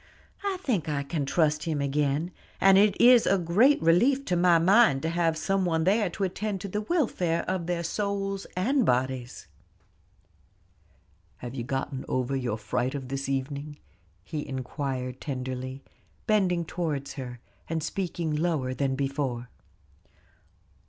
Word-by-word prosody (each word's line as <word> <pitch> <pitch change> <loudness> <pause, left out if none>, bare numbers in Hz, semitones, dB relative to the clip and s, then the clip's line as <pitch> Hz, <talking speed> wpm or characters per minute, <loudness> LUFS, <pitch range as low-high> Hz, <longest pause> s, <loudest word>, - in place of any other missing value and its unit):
I 395 -2 -1
think 210 - -1
I 140 -1 -1
can 140 -1 -3
trust 150 0 +1
him 160 -3 -1
again, 145 +4 0 0.3
and 195 0 +6
it 205 -1 +3
is 245 -1 +7
a 195 - +4
great 200 - +4
relief 245 +12 +3
to 180 - 0
my 175 -1 +5
mind 180 - +4
to 160 - 0
have 165 -1 +1
some 195 +3 0
one 165 -2 +1
there 200 +2 +2
to 195 +4 -4
attend 195 +2 -2
to 200 - -4
the 210 +2 -2
welfare 210 - 0
of 185 -2 -2
their 175 -1 -1
souls 195 +2 -2
and 255 +8 +2
bodies." 125 - -1 1.9
"Have 120 0 -7
you 125 -3 -4
gotten 135 +1 -3
over 130 +1 -1
your 125 -5 -2
fright 120 +5 -2
of 135 -2 -6
this 135 0 -3
evening?" 140 +2 -3 0.5
he 150 +6 -4
inquired 130 -1 -4
tenderly, 130 -1 -5 0.4
bending 185 -6 +2
towards 150 -5 -3
her, 125 -3 -7 0.3
and 160 -1 -2
speaking 170 -2 -2
lower 150 -5 0
than 135 0 -1
before. 135 -3 -2
160 Hz, 145 wpm, -27 LUFS, 135-190 Hz, 1.9 s, is